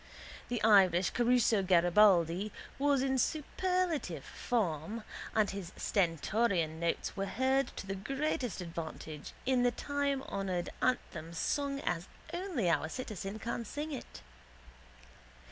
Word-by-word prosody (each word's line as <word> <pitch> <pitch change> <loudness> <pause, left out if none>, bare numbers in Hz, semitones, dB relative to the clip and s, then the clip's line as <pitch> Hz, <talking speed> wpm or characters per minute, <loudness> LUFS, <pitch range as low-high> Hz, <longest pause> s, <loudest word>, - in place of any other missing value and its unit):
The 240 -3 -2
Irish 190 -4 +5
Caruso 240 -3 +3
Garibaldi 180 +1 +4 0.3
was 280 -2 +3
in 265 -1 +1
superlative 320 - 0
form 210 -1 -2 0.3
and 215 -2 +3
his 195 -3 -6
stentorian 170 -2 +1
notes 170 0 -1
were 195 0 -2
heard 265 +4 +2
to - - -5
the 195 - -3
greatest 265 - -2
advantage 160 -3 -6
in 255 -1 +3
the 245 0 +4
timehonoured 265 -10 -2
anthem 170 -10 -1
sung 280 - -1
as 175 -5 -2 0.3
only 345 - -1
our 165 -1 +2
citizen 210 -1 -5
can 235 +1 -3
sing 295 +7 -5
it. 270 - -8
215 Hz, 115 wpm, -33 LUFS, 175-265 Hz, 0.3 s, Irish